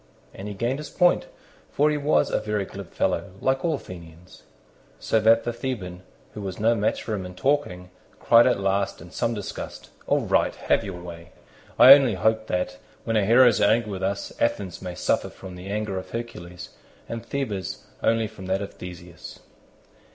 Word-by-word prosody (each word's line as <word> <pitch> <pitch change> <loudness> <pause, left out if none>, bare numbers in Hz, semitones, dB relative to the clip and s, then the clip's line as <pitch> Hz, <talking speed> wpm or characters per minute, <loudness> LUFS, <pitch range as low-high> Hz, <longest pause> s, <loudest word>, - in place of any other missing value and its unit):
And 95 - -8
he 105 - -6
gained 120 +7 -1
his 150 - -7
point, 180 -1 +2 0.4
for 150 +1 +2
he - - 0
was 145 +1 +2
a - - +1
very 105 -2 -2
glib 95 -2 -10
fellow, - - -1
like 130 +3 0
all 165 -2 +1
Athenians; 85 - -12 0.6
so 110 - +1
that 115 +1 +4
the 120 - -2
Theban, 100 -8 -5 0.3
who 105 - -7
was 95 -2 -5
no 115 +2 +3
match 110 -2 -1
for 110 - -4
him 100 -3 -3
in 90 0 -9
talking, 90 -6 -1 0.3
cried 115 +1 +6
at 125 - +2
last 100 0 0
in - - -12
some 115 - -1
disgust, 105 -2 -7 0.2
"All - - +2
right, - - +1
have - - +1
your 95 -3 -6
way; 85 0 -10 0.4
I 135 - +11
only 135 -7 +4
hope 110 +3 +1
that, 90 -1 -2 0.3
when 115 - -1
our 105 - +4
heroes 120 +3 +5
are - - +5
angry 110 -1 +1
with 95 -1 -5
us, 100 +1 -2
Athens 95 -4 -1
may 90 -2 -6
suffer - - 0
from 95 -1 -11
the 90 +1 -9
anger 100 -1 -2
of - - -11
Hercules, 100 -7 -7 0.4
and 115 0 -5
Thebes 115 -8 -4 0.2
only 115 0 +2
from 100 -3 -9
that 95 +2 0
of 100 - -8
Theseus." 90 -2 -10
105 Hz, 190 wpm, -25 LUFS, 90-115 Hz, 0.6 s, I